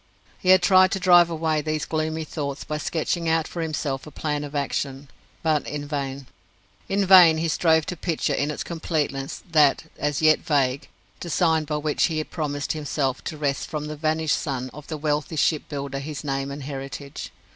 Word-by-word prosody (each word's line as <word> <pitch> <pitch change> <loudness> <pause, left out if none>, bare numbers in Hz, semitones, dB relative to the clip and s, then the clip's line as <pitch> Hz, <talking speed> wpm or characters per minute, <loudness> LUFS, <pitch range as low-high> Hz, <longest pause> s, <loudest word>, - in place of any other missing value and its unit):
He 185 - -1
had 185 -1 +7
tried 185 0 +6
to 195 - -1
drive 175 -2 +6
away 160 -2 0
these 155 0 -2
gloomy 160 0 -2
thoughts 140 -3 -4
by 150 0 -4
sketching 165 +2 -1
out 160 -1 +1
for 170 - -5
himself 150 -3 -3
a - - -7
plan 150 0 -3
of 145 0 -7
action 140 -1 -2 0.3
but 155 -3 +1
in 145 0 -4
vain. 140 -2 -4 0.6
In 200 0 +1
vain 180 -4 +8
he 165 +1 0
strove 160 +1 +3
to 180 - -4
picture 165 -1 -1
in 145 - 0
its 150 - -3
completeness 150 -5 -3
that 150 -3 +4 0.2
as 145 -1 0
yet 155 -1 +5
vague 140 -3 0 0.3
design 165 -2 +1
by 150 0 -2
which 150 0 +1
he 155 -2 -1
promised 145 -3 -3
himself 145 -3 -2
to 155 - -4
wrest 145 -2 -1
from 150 -2 -4
the 155 0 -5
vanished 155 0 0
son 130 -3 -4
of 150 0 -11
the 155 - -4
wealthy 150 +1 -1
ship 155 0 +1
builder 140 -2 -4
his 140 -1 -6
name 135 -1 -2
and 140 0 -6
heritage. 140 0 -7
150 Hz, 190 wpm, -24 LUFS, 140-160 Hz, 0.6 s, vain